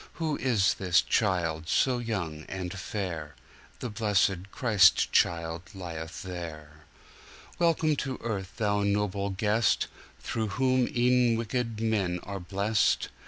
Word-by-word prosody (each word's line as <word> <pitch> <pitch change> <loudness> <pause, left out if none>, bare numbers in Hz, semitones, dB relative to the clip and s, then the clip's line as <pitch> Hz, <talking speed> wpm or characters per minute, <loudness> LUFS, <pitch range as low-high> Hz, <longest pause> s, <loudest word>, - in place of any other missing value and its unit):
Who 160 -3 -2
is 110 -7 +2
this 90 -2 +2
child 85 -6 0
so 125 -2 +2
young 85 -10 -4
and 90 -2 -4
fair? 90 -6 -5 0.5
The 120 - -4
blessed 100 -3 +1
Christ 105 -7 +4
child 85 0 +1
lieth 85 -3 -6
there. 75 -4 -8 0.7
Welcome 165 -2 +3
to 135 -1 -3
earth, 100 -5 -3
Thou 105 -3 +1
noble 100 -1 0
guest, 105 +4 +1 0.3
Through 110 -1 -2
whom 130 -1 +3
e'en 125 -1 +3
wicked 115 -1 -2
men 100 -6 0
are 100 -1 -5
blest! 100 +4 +1
100 Hz, 120 wpm, -28 LUFS, 90-115 Hz, 0.7 s, Christ